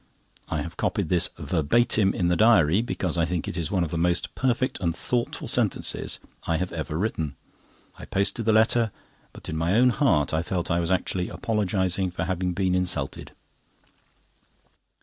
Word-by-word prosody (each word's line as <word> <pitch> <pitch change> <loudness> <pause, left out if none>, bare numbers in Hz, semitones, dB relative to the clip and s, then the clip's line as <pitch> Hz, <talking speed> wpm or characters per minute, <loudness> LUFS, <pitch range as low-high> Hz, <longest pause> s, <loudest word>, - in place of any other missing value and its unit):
I - - -1
have - - -9
copied - - -1
this 90 -2 +3
verbatim 95 +5 +2
in 90 - 0
the 90 - +2
diary, 105 -4 +4
because 90 -7 -2
I 85 - +3
think 85 0 -3
it - - -4
is 85 -3 -2
one 95 -3 +1
of 80 - -4
the 85 - -2
most 85 +1 +1
perfect 130 0 0
and 85 -2 -1
thoughtful 120 -1 -2
sentences - - +1 0.3
I 85 - +1
have 90 +2 -3
ever 75 -2 -4
written. 80 -7 -2 0.6
I - - -8
posted 100 +3 0
the 110 - +4
letter, 110 +1 +3 0.4
but - - -11
in 80 - -4
my 85 +4 +1
own 125 +2 +5
heart 80 - +2
I 80 - +1
felt 85 0 -3
I 85 - +2
was 85 - -1
actually 90 -1 0
apologising 95 -1 -1
for 85 -1 -4
having 90 +1 -1
been 95 0 0
insulted. 90 -7 -2
90 Hz, 175 wpm, -25 LUFS, 85-105 Hz, 0.6 s, own